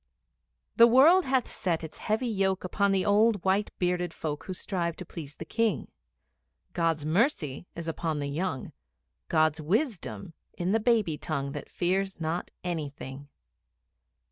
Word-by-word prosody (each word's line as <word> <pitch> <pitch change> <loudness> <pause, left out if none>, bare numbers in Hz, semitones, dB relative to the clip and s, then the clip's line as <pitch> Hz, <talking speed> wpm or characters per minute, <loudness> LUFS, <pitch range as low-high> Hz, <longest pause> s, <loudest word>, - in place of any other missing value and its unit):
The 235 - +9
World 305 +10 +6
hath 260 -1 +1
set 170 -5 -2
its 160 - -8
heavy 220 +4 0
yoke 195 -4 0
Upon 200 +2 +1
the 190 -1 +1
old 210 -1 +3
white 195 +2 +2
bearded 180 -1 0
folk 150 -2 -4
Who 190 - -4
strive 175 -3 -2
to 185 - -8
please 150 -3 -9
the - - -7
King. 230 -1 0 0.8
God's 165 -3 0
mercy 175 - 0
is 170 -1 -6
upon 165 -1 -2
the 145 - -2
young, 145 -1 -3 0.6
God's 155 -1 +2
wisdom 170 - -1 0.2
in 180 +2 0
the 225 - +3
baby 215 - +2
tongue 140 -4 -2
That - - -7
fears 190 +2 -1
not 165 +2 -2
anything. 145 -5 -5
180 Hz, 145 wpm, -28 LUFS, 155-210 Hz, 0.8 s, The